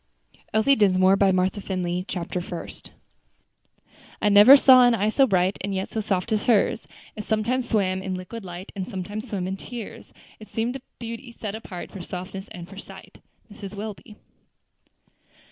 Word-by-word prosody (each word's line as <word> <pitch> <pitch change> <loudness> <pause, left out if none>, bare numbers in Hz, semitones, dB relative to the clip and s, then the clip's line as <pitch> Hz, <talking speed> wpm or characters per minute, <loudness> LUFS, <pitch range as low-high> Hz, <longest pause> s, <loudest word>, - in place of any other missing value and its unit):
ELSIE 220 +6 +4
DINSMORE 190 -3 +4
BY 195 -1 +3
MARTHA 185 +2 0
FINLEY 180 -2 -3
CHAPTER 180 0 -3
FIRST 175 -1 -8 1.3
"I 210 - +2
never 205 +7 +9
saw 260 -2 +7
an 245 -1 +5
eye 210 0 +1
so 270 +4 +3
bright, 185 -2 +1
And 195 0 -3
yet 190 0 -3
so 220 - -3
soft 200 +1 -2
as 215 -1 +1
hers; 225 -2 +2 0.3
It 210 - -6
sometimes 235 +4 -1
swam 190 -4 +1
in 190 -1 -3
liquid 190 +5 -7
light, 180 +1 -8
And 190 -1 -4
sometimes 210 +3 -6
swam 190 -4 -3
in 190 +1 -3
tears; 230 +1 -9 0.3
It 215 - -12
seemed 230 +3 -2
a 270 - -6 0.2
beauty 235 +1 -7
set 215 -3 -6
apart 200 -5 -8
For 195 - -8
softness 185 +2 -7
and 175 -1 -10
for 195 +1 -11
sighs." - - -12 0.4
MRS. 205 -1 -9
WELBY. 210 +1 -8
200 Hz, 170 wpm, -24 LUFS, 185-225 Hz, 1.3 s, never